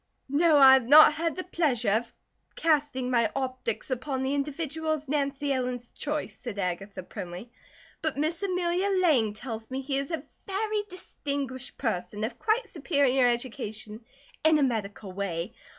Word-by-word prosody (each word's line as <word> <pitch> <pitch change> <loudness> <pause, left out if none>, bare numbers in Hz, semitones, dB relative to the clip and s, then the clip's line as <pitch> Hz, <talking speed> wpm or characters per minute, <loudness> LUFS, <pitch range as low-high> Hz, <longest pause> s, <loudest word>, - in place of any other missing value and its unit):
"No, 305 +2 +4
I 270 -2 +9
have 260 -3 +4
not 300 +2 +9
had 330 +1 -1
the 370 - -4
pleasure 275 - 0
of 230 +2 0 0.4
casting 290 -5 +1
my 235 -3 +3
optics 255 -2 -3
upon 260 +1 -2
the 265 +1 0
individual 305 +2 -2
of 305 -1 -5
Nancy 280 0 0
Ellen's 250 -2 -3
choice," 300 0 -4
said 235 -5 -6
Agatha 185 +1 -3
primly, 180 +6 -8 0.5
"but 315 -3 -2
Miss 315 +4 -1
Amelia 365 0 0
Lang 260 - +3
tells 225 0 -7
me 260 0 -3
he 270 0 -1
is 275 - -4
a 325 - -3 0.2
very 420 +2 -1
distinguished 280 -7 -5
person, 210 -3 -2
of 230 +2 -4
quite 445 +2 +1
superior 275 -6 +2
education 230 -3 -4 0.4
in 315 0 +5
a 295 - +3
medical 210 -5 -2
way. 185 +1 -3
270 Hz, 155 wpm, -28 LUFS, 230-310 Hz, 0.5 s, I